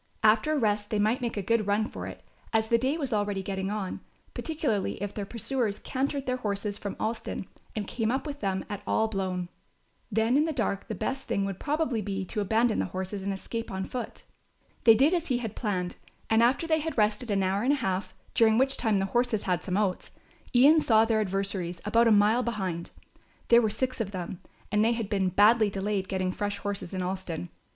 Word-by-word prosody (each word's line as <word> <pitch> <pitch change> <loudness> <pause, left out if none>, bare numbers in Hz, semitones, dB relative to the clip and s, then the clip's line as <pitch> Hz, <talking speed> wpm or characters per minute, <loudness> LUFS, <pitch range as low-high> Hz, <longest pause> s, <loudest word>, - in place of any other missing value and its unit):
After 220 +8 +4
a - - +1
rest 210 -4 +1
they 215 - 0
might 215 +5 +2
make 235 -3 -2
a 200 - -1
good 225 0 +1
run 210 +2 +2
for - - -7
it, - - -9 0.3
as 220 0 +2
the 235 - +4
day 265 +6 0
was 275 -6 -2
already 205 -2 0
getting 190 0 -3
on, 205 -3 -3 0.3
particularly 290 - -1
if 205 +1 -4
their 205 -2 -4
pursuers 230 -2 -2
cantered 275 +1 -2
their 255 0 0
horses 205 -3 -2
from 200 -1 -5
Alston 220 -3 -3 0.3
and 210 -2 -2
came 225 +2 -1
up 265 +4 -1
with 290 -1 -5
them 190 -2 -1
at 205 -2 -5
all 220 - +2
blown. 185 -4 -2 0.6
Then 225 +5 +3
in 300 - +4
the 320 - -1
dark 220 -6 -1
the - - -4
best 270 0 -3
thing 200 - 0
would 195 -2 -4
probably 295 -6 0
be 195 -1 -3
to 210 +3 -2
abandon 220 +3 +2
the - - +1
horses 190 +2 -4
and 200 +1 -2
escape 230 +4 -5
on 190 0 -3
foot. 250 +4 -6 0.6
They 225 -2 +9
did 280 +9 +4
as 345 -1 0
he 255 - +1
had 225 -4 -5
planned, 185 -6 -2 0.3
and 220 +1 +5
after 250 +7 +3
they 320 -1 +2
had 320 -1 -4
rested 215 +3 +1
an 195 -2 +2
hour 190 +2 +1
and 260 +5 +3
a - - +3
half, 195 -7 -2 0.2
during 225 -2 +4
which 270 +2 +2
time 220 -4 +2
the 195 - +1
horses 235 +1 0
had 180 -2 0
some 185 0 -1
oats, 200 -3 0 0.5
Ian 290 +6 +7
saw 220 -6 +4
their 225 -1 +2
adversaries 190 -3 -2
about 230 +2 +4
a - - +5
mile 210 +3 +5
behind. 190 -8 -3 0.6
There 235 0 +7
were 220 - +2
six 255 +3 -2
of 200 -3 -3
them 180 -2 -5 0.3
and 210 +1 +3
they 230 +2 +3
had 225 -3 -3
been 195 -2 +2
badly 210 +3 +5
delayed 195 0 -2
getting 185 -1 -1
fresh 205 +2 -2
horses 200 -3 -4
in 185 -1 -2
Alston. 180 -2 -4
215 Hz, 220 wpm, -28 LUFS, 195-240 Hz, 0.6 s, They